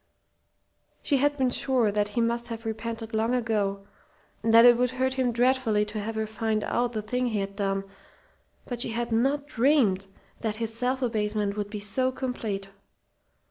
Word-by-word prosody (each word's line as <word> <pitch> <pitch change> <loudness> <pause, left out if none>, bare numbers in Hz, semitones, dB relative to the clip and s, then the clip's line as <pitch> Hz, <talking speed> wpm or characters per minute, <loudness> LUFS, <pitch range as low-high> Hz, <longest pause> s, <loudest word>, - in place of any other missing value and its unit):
She 285 - +2
had 290 +2 +2
been 260 -2 +2
sure 245 -5 +2
that 205 0 +1
he 210 +3 -1
must 235 +1 0
have 230 -1 -6
repented 225 +1 -5
long 225 +3 +1
ago, 205 -5 -1 0.6
and 225 - +1
that 230 +1 +8
it 240 0 +8
would 250 +1 +1
hurt 260 +1 -1
him 260 -2 +1
dreadfully 240 -3 +2
to 210 +1 -5
have 220 +2 -4
her 220 0 -1
find 220 0 -1
out 240 0 0
the 215 -2 -3
thing 250 +4 -1
he 220 -3 -1
had 195 0 -4
done, 195 -1 -1 0.8
but 245 -2 -4
she - - 0
had 235 0 -2
not 270 +6 +1
dreamed 235 -8 +2 0.3
that 220 -2 -2
his 225 0 -4
self 250 +3 -1
abasement 210 -3 -1
would 205 -1 -3
be 210 0 -5
so 255 +6 0
complete. 225 -7 -4
230 Hz, 180 wpm, -27 LUFS, 210-250 Hz, 0.8 s, that